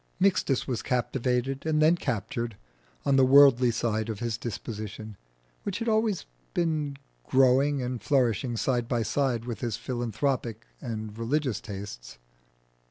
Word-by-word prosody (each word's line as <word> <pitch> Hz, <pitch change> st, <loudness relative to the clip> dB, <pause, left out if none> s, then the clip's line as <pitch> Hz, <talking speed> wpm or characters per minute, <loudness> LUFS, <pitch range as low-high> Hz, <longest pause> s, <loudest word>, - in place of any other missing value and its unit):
Mixtus 185 Hz, -9 st, +2 dB
was 125 Hz, -4 st, -2 dB
captivated 125 Hz, +1 st, -1 dB
and 155 Hz, -1 st, +1 dB
then 155 Hz, +3 st, +5 dB
captured 120 Hz, -, -3 dB, 0.5 s
on 140 Hz, -1 st, +3 dB
the 135 Hz, -, +6 dB
worldly 130 Hz, -2 st, +7 dB
side 110 Hz, -1 st, -1 dB
of 110 Hz, -, -3 dB
his 115 Hz, -2 st, -1 dB
disposition, 110 Hz, -1 st, -6 dB, 0.5 s
which 200 Hz, -2 st, -3 dB
had 230 Hz, -, -3 dB
been 225 Hz, -, +2 dB
always 215 Hz, -3 st, +1 dB, 1.0 s
growing 135 Hz, +1 st, +4 dB
and 125 Hz, -1 st, -3 dB
flourishing 120 Hz, -3 st, +1 dB
side 120 Hz, -1 st, 0 dB
by 120 Hz, -2 st, 0 dB
side 120 Hz, 0 st, 0 dB
with 120 Hz, -2 st, -5 dB
his 115 Hz, -4 st, -2 dB
philanthropic 120 Hz, -1 st, -2 dB, 0.2 s
and 110 Hz, -2 st, -5 dB
religious 130 Hz, +1 st, 0 dB
tastes. -, -, -8 dB
125 Hz, 135 wpm, -28 LUFS, 115-135 Hz, 1.0 s, worldly